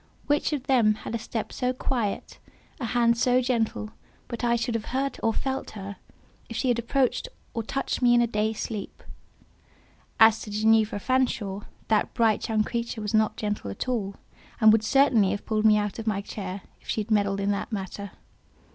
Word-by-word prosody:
Which 290 +2 +1
of 290 -4 -2
them 240 -6 +3
had - - -4
a 230 - -1
step 225 0 -4
so 250 0 0
quiet, 240 -5 -3 0.4
a 250 - -3
hand 235 0 +2
so 250 +2 +4
gentle, 230 -4 -1 0.4
but 235 - -5
I 235 0 +3
should 235 +1 -1
have 225 -1 -2
heard 270 +2 -2
or 225 - +2
felt 265 +4 -3
her, 200 0 -7 0.5
if 230 - -5
she 260 - 0
had 240 -1 +2
approached 255 - 0 0.3
or 230 - -1
touched 270 +5 -3
me 240 -1 +5
in 240 - +5
a - - +3
day 215 -1 0
sleep? 215 -2 -6 1.2
As 225 0 +7
to - - -7
Ginevra 215 0 +3
Fanshawe, 220 -6 0 0.2
that 215 -1 +1
bright 225 -2 +2
young 215 -1 +2
creature 235 0 -3
was 210 0 -3
not 215 0 +2
gentle 210 - -3
at 100 - -5
all, 205 -6 -1 0.4
and 220 -1 +7
would 220 0 +3
certainly 240 -5 +4
have 205 - -3
pulled 215 -1 0
me 215 -1 +6
out 210 +1 -2
of 225 - -6
my 210 -2 +1
chair, 195 -1 -6 0.2
if - - -18
she 220 - 0
had 215 +2 -7
meddled 200 -2 +2
in 200 +1 +1
the 200 - -2
matter. 200 -1 -5
225 Hz, 195 wpm, -26 LUFS, 210-240 Hz, 1.2 s, As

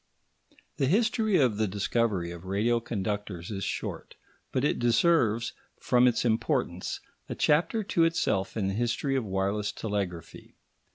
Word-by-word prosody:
The 135 - +1
history 220 - +2
of 125 -9 +2
the 110 0 +1
discovery 100 -2 0
of 85 +1 -9
radio 110 +5 +1
conductors 105 -4 -4
is 100 -1 -4
short, - - -4 0.4
but 130 - 0
it 150 - +1
deserves, 120 -2 +2 0.3
from 125 0 +4
its 125 0 +1
importance, 115 - -1 0.3
a - - -3
chapter 175 +9 +2
to 170 -4 +2
itself 105 -12 0
in 100 -3 0
the 95 - -1
history 120 +5 0
of 130 - +1
wireless 100 +1 -1
telegraphy. 100 -6 -5
115 Hz, 145 wpm, -28 LUFS, 100-130 Hz, 0.4 s, from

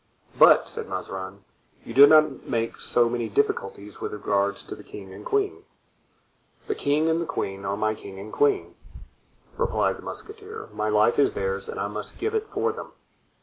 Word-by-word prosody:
"But," - - +7
said - - -5
Mazarin, 95 +1 -6 0.4
"you 115 - -7
did 140 +3 +9
not 155 -3 +4
make 115 0 -1
so 120 -1 +2
many 120 -1 -2
difficulties 100 -3 -2
with - - -4
regard 100 -1 0
to - - -7
the - - -10
king 95 -2 -10
and - - -10
queen." 410 -1 -1 1.0
"The 425 - -1
king 150 - +1
and 165 +1 +2
the 170 - -3
queen 100 -9 -3
are 100 +1 -1
my 110 0 +1
king 100 -2 -10
and 100 +2 -9
queen," 420 -3 +2 0.8
replied - - +1
the - - -9
musketeer, 435 +1 -8
"my 110 - -1
life 105 +4 +3
is 140 - +4
theirs 95 0 -2
and - - -5
I - - -1
must 105 +1 -5
give 430 +3 -2
it 440 0 -1
for 455 - 0
them. 460 - -9
115 Hz, 185 wpm, -25 LUFS, 100-165 Hz, 1.0 s, did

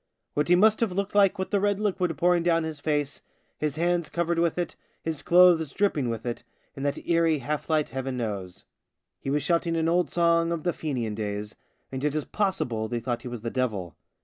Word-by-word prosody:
What 150 - 0
he 175 - +6
must 215 +4 +5
have 230 -5 +1
looked 200 +2 -2
like 200 -2 +4
with 190 - -3
the 200 - +3
red 205 0 +1
liquid 185 -5 0
pouring 175 0 +3
down 165 -1 +2
his 160 -2 -5
face, 145 -1 -1 0.4
his 150 -1 -1
hands 170 0 0
covered 170 0 0
with 170 0 +1
it, 175 - -2 0.3
his 160 -3 -3
clothes 175 -4 +5
dripping 155 -11 +1
with 115 0 -4
it, 120 -1 -4 0.3
in 135 - -7
that 140 0 -2
eerie 165 -2 +3
half 145 +4 -4
light, 155 -2 +2
Heaven 130 0 -4
knows. 100 -6 -5 0.5
He - - -5
was 145 0 +1
shouting 170 +1 +1
an 165 0 +1
old 175 +1 +2
song 170 -1 +2
of 165 -2 -2
the 175 - +1
Fenian 125 -8 -3
days, 105 0 -4 0.4
and 130 0 -4
it 150 0 0
is 155 - -1
possible 125 - -1
they 120 +1 -2
thought 120 0 -3
he - - -7
was 120 -2 -6
the 115 0 -4
devil. 110 -9 -2
160 Hz, 215 wpm, -26 LUFS, 130-175 Hz, 0.5 s, he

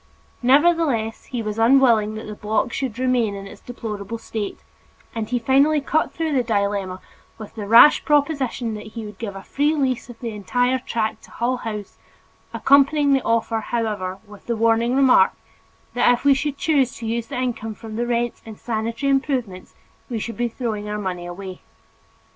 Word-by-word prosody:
Nevertheless 275 -4 +2
he 240 -3 -4
was 215 +1 -4
unwilling 230 -3 +4
that 220 - -7
the 215 - -6
block 210 +3 -1
should 255 -5 -3
remain 250 -5 +1
in 195 0 -7
its 195 - -12
deplorable 225 -3 -6
state, 220 -2 -5 0.6
and 225 -2 -4
he 250 - +1
finally 275 +6 +3
cut 305 +3 0
through 320 -2 -2
the 265 - +3
dilemma 200 -4 -1 0.4
with 215 - -10
the 210 -3 -6
rash 235 +7 +7
proposition 280 -6 0
that 210 0 -7
he 225 - -4
would 210 -2 -10
give 205 -4 -5
a 195 - -8
free 295 +3 0
lease 260 -4 -1
of 240 - -10
the 235 -2 -4
entire 245 +5 0
tract 220 -3 -3
to - - -20
Hull 245 +2 -1
House, 210 -4 -7 0.5
accompanying 280 +1 +4
the 270 - +3
offer, 230 -1 0
however, 210 -5 -3
with 205 -1 -15
the 235 - 0
warning 230 +2 +2
remark, 260 -8 +5 0.6
that 245 0 +4
if 245 +3 -1
we 280 - +7
should 285 +1 -2
choose 275 -6 +1
to 230 - -8
use 230 +1 -2
the 280 - -5
income 230 -3 -3
from 220 -1 -9
the 240 +1 -1
rents 240 0 -1
in 220 -1 -10
sanitary 230 +4 -2
improvements 255 -9 -2 0.3
we 240 - -2
should 230 +2 -5
be 240 0 0
throwing 220 -3 -4
our 210 - -2
money 180 -4 -4
away. 185 +1 -8
230 Hz, 185 wpm, -22 LUFS, 215-260 Hz, 0.6 s, rash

